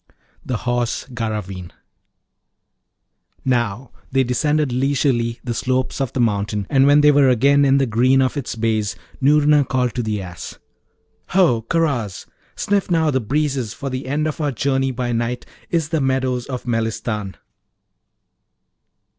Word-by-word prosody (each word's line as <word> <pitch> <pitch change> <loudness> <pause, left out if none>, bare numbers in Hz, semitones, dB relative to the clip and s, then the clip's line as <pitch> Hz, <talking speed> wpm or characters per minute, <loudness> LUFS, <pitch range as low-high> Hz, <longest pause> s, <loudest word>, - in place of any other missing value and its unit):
THE 125 - -2
HORSE 120 0 -2
GARRAVEEN 105 -6 -4 1.7
Now, 120 -1 -1 0.2
they 135 0 +3
descended 150 +3 0
leisurely 125 -3 0
the 120 - -3
slopes 130 +3 -1
of 135 - -1
the - - -4
mountain, 105 -3 0
and 135 0 +4
when 145 +1 +6
they 150 0 +6
were 140 -2 +5
again 140 +4 +4
in 135 0 +4
the 135 - +2
green 125 +3 +3
of 130 +1 +1
its 140 -5 -4
base, 110 -2 -1 0.3
Noorna 150 +1 +4
called 125 -2 -1
to 125 - -2
the 110 -2 -2
Ass, 90 -2 -8 0.7
'Ho! 170 -11 +3
Karaz! 140 - -1 0.3
Sniff 200 -2 0
now 160 -3 +2
the 130 -1 0
breezes, 135 -2 -1
for 135 +3 -5
the 130 0 -4
end 145 +3 0
of 155 0 -3
our 145 -1 0
journey 135 +1 0
by 125 -1 -3
night 120 +1 -2 0.2
is 165 -3 0
the 160 -2 0
meadows 130 -2 0
of 130 -2 -5
Melistan. 115 -3 -2
130 Hz, 145 wpm, -20 LUFS, 115-140 Hz, 1.7 s, when